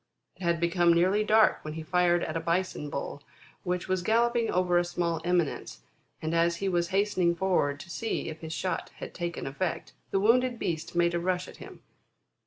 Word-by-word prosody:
It - - -20
had 170 -2 +1
become 170 0 +3
nearly 190 +5 +3
dark 215 +1 +4
when 155 0 -6
he 160 - -5
fired 175 0 +2
at 155 - -4
a - - +1
Bison 170 -2 -1
bull 140 0 -5 0.4
which 180 -1 -2
was 185 -1 0
galloping 235 +3 +2
over 180 -1 +2
a - - +2
small 175 -1 -2
eminence, 175 -4 -1 0.4
and 160 +1 -1
as 170 0 +3
he 195 +3 -3
was 175 -2 +1
hastening 190 -2 +1
forward 170 -6 +1
to 190 - -12
see 225 +6 -3
if 160 -1 -6
his 160 -1 -6
shot 185 +3 -2
had - - -8
taken 170 -1 -4
effect, 160 +6 -3 0.2
the 195 - +1
wounded 240 +4 +3
beast 165 -5 -3
made 170 0 +3
a 170 - 0
rush 180 +1 -1
at - - -12
him. - - -12
175 Hz, 195 wpm, -28 LUFS, 170-190 Hz, 0.4 s, dark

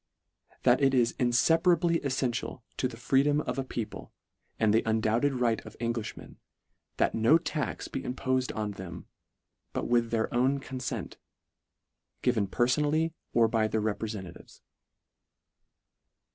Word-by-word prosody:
"That 125 +2 +4
it 135 -1 +4
is 120 -2 +3
infeparably 165 +7 +3
eSfential 130 -3 -2
to 130 - +1
the 120 -2 -10
freedom 135 +4 +2
of 140 - -3
a - - 0
people 115 -4 -6 0.5
and 110 -2 +3
the 115 - +4
undoubted 110 +5 +1
right 120 -3 0
of - - -12
Englishmen, 115 -2 -4 0.6
that - - +2
no 115 +8 +5
tax 160 -3 -3
be - - -4
impofed 130 0 -1
on 105 -1 -2
them, 90 -3 -8 0.7
but - - -2
with 120 -1 +2
their 115 -1 -1
own 130 +3 +2
confent, 130 -1 -5 1.1
given 115 -5 +2
perfonally 150 +9 +1 0.2
or 115 -1 +5
by 110 -1 +1
their 110 - -1
reprefentatives." 105 -4 -5
120 Hz, 130 wpm, -29 LUFS, 110-135 Hz, 1.1 s, no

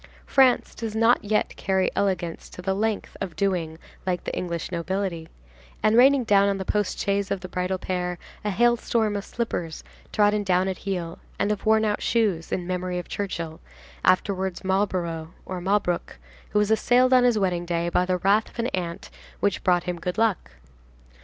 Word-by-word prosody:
France 260 -2 +3
does 225 -2 -5
not 230 +2 +4
yet 210 +1 0
carry 190 -1 +1
elegance 180 -4 -1
to - - -13
the 190 +1 +1
length 215 +1 -2
of 185 -5 -4
doing 170 -4 -1 0.3
like 180 -2 -1
the - - -4
English 170 -2 -3
nobility, 175 -1 -3 0.5
and 215 +1 +4
raining 265 +2 +6
down 200 -2 +4
on 200 - 0
the 190 - -4
post 210 0 0
chaise 200 0 0
of 195 -2 -2
the 185 - -6
bridal 180 +1 -2
pair 180 -1 -3 0.3
a 210 - -1
hail 240 +4 +4
storm 220 -2 0
of 200 - -2
slippers 175 -10 -4 0.3
trodden 210 -1 +3
down 185 -1 +2
at 190 -2 -3
heel 170 -3 -3 0.2
and 205 - +1
of 210 +1 -3
worn 220 0 +4
out 210 -1 0
shoes, 205 -8 0
in 180 - -2
memory 180 0 -2
of 180 - -5
Churchill, 170 -5 -4 0.4
afterwards 190 0 +1
Marlborough, 180 -4 -1
or 185 -1 -5
Malbrouck, 185 - 0 0.3
who - - -1
was 210 +1 +2
assailed 250 +3 +4
on 250 -1 +6
his 245 -3 +4
wedding 180 -4 0
day 170 0 0
by 175 +1 +2
the 180 0 0
wrath 200 +4 +2
of - - -19
an 235 +1 0
aunt 170 -2 -4 0.3
which 200 - 0
brought 175 -1 +3
him 180 -1 -4
good 180 0 -3
luck. 220 - 0
190 Hz, 185 wpm, -25 LUFS, 180-210 Hz, 0.5 s, raining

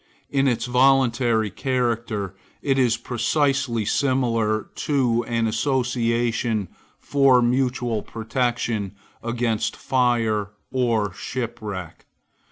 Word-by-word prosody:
In 140 -1 +2
its 120 -3 0
voluntary 125 -4 +3
character 115 -5 -1 0.3
it 135 -1 +2
is 120 -3 +3
precisely 125 0 0
similar 115 -5 +1
to 125 -5 +1
an 115 -1 0
association 115 - 0 0.3
for 135 -3 +4
mutual 125 -2 +1
protection 115 -3 -2 0.3
against 115 -2 -1
fire 115 -5 +1 0.2
or 115 -6 +1
shipwreck. 105 -6 -6
120 Hz, 85 wpm, -23 LUFS, 110-130 Hz, 0.3 s, for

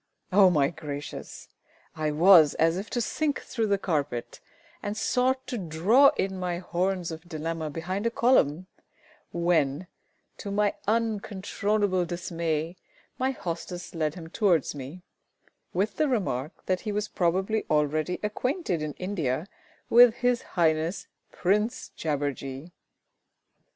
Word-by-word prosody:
Oh, 190 0 +7
my 145 -5 +3
gracious! 145 -3 -7 0.5
I 155 -1 -1
was 160 0 +6
as 165 +1 +3
if 195 +4 -5
to 240 - -1
sink 290 +5 -1
through 225 -3 -2
the 200 -1 +2
carpet, 145 -10 -2 0.4
and 205 +1 -4
sought 260 +4 +1
to 245 - -4
draw 190 - +4
in 190 -1 -1
my 180 -1 -2
horns 180 0 -1
of 160 +2 -9
dilemma 160 0 -3
behind 185 +8 -3
a - - +3
column, 185 - +2 0.7
when, 170 -2 +1 0.5
to 200 - -6
my 205 +1 +1
uncontrollable 205 -3 0
dismay, 170 -1 -3 0.4
my 260 +1 +2
hostess 175 -6 -5
led 155 -2 -1
him 165 -3 -8
towards 175 - +1
me, 145 +6 -8 0.7
with 200 +4 -1
the 305 - +2
remark 175 - -2
that 185 -1 0
he 215 - -3
was 210 +1 -1
probably 190 +5 0
already 155 +3 +1
acquainted 210 - -1
in 150 -1 -3
India 165 -6 -2 0.4
with 240 -1 +7
His 245 -1 +1 0.2
Highness 160 +2 +1 0.3
Prince 210 +6 0
JABBERJEE. 145 0 -3
180 Hz, 130 wpm, -27 LUFS, 160-210 Hz, 0.7 s, Oh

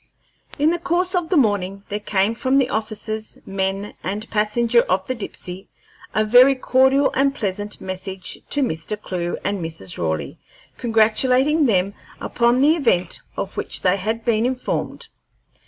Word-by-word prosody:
In 300 +3 +3
the 345 - -1
course 355 +2 0
of 350 -3 0
the 365 - +2
morning 200 -5 +1
there 205 - -2
came 205 +1 +1
from 260 +3 +1
the 265 -2 +2
officers, 215 0 -4
men, 195 +1 -2
and 210 +4 -4
passenger 230 +2 +3
of 185 +1 +1
the 255 - -2
Dipsey 190 -5 -7 0.5
a 215 - +3
very 250 +5 +7
cordial 265 +2 +3
and 275 0 +2
pleasant 205 -3 -3
message 185 0 -6
to 290 - +2
Mr. 165 -1 -3
Clewe 175 -4 -3
and 200 0 -1
Mrs. 160 - -6
Raleigh, 80 -2 -3 0.4
congratulating 255 +6 +3
them 195 -2 +1 0.3
upon 240 +2 +1
the 300 +3 +5
happy 330 - -2
event 180 -9 +1 0.2
of 195 - -4
which - - -2
they 185 +1 +3
had 220 +4 -3
been 230 0 +2
informed. 255 0 -3
215 Hz, 155 wpm, -21 LUFS, 195-260 Hz, 0.5 s, very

